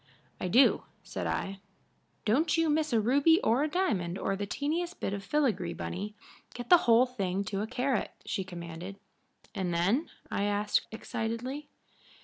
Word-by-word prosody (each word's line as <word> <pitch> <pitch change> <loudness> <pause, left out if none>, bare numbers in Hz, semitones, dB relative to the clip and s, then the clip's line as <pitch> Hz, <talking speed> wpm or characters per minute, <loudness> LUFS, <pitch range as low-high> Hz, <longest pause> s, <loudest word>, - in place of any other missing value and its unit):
"I - - -2
do," 245 +10 +5 0.2
said - - -4
I. 195 0 -2 0.7
"Don't 300 +10 +3
you 330 -2 +3
miss 310 0 +1
a 230 - +4
ruby 280 - +4
or 235 +5 +3
a 300 - +2
diamond 195 - 0
or 195 - -1
the 200 +1 -4
teeniest 335 - -2
bit 195 - -2
of 200 -1 -4
filigree, 200 - 0
Bunny. 205 +4 -5 0.4
Get 240 -1 -7
the 355 - +11
whole 230 +2 +7
thing 200 -6 -2
to 200 0 -3
a 215 - -2
carat," 255 +2 0 0.2
she 190 - -2
commanded. 175 +1 -7 0.6
"And 185 -2 -2
then?" 195 - +1 0.2
I 200 - 0
asked, 205 0 +1
excitedly. 230 +6 -4
220 Hz, 160 wpm, -30 LUFS, 195-280 Hz, 0.7 s, the